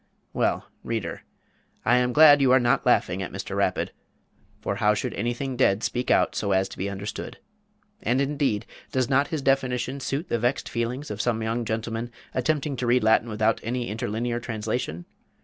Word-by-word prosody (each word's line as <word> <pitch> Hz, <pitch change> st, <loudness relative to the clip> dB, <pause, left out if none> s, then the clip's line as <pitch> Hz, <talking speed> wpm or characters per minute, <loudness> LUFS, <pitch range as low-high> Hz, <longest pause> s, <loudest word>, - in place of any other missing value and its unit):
Well, -, -, 0 dB, 0.2 s
reader, -, -, -3 dB, 0.6 s
I 125 Hz, +2 st, +5 dB
am 125 Hz, 0 st, +2 dB
glad 145 Hz, +1 st, +8 dB
you 130 Hz, -2 st, +4 dB
are 130 Hz, -, +7 dB
not 120 Hz, -1 st, +2 dB
laughing 90 Hz, +2 st, +2 dB
at 95 Hz, -, -4 dB
Mr. -, -, -5 dB
Rapid; -, -, 0 dB, 0.7 s
for -, -, -3 dB
how 105 Hz, 0 st, +3 dB
should -, -, -3 dB
anything 120 Hz, +4 st, -2 dB
dead 110 Hz, -4 st, +2 dB
speak 125 Hz, +1 st, -1 dB
out -, -, +3 dB
so 100 Hz, -2 st, 0 dB
as 95 Hz, 0 st, +2 dB
to -, -, -10 dB
be 100 Hz, +2 st, -1 dB
understood? 100 Hz, +1 st, -6 dB, 0.6 s
And 130 Hz, -8 st, +1 dB
indeed, 140 Hz, -6 st, 0 dB, 0.3 s
does 130 Hz, -2 st, 0 dB
not 140 Hz, +2 st, +3 dB
his 155 Hz, -3 st, -3 dB
definition 130 Hz, -1 st, +1 dB
suit 140 Hz, +5 st, -3 dB
the 120 Hz, -, 0 dB
vexed 120 Hz, +4 st, 0 dB
feelings 125 Hz, +4 st, -3 dB
of 105 Hz, 0 st, -2 dB
some 115 Hz, -1 st, 0 dB
young 115 Hz, +1 st, -1 dB
gentlemen 115 Hz, +1 st, -3 dB, 0.2 s
attempting 145 Hz, +2 st, 0 dB
to 125 Hz, -, -2 dB
read 125 Hz, 0 st, +3 dB
Latin 110 Hz, +1 st, +3 dB
without 110 Hz, +1 st, +1 dB
any 120 Hz, +1 st, -2 dB
interlinear 115 Hz, +3 st, -2 dB
translation? 110 Hz, -, -3 dB
120 Hz, 180 wpm, -25 LUFS, 110-130 Hz, 0.7 s, glad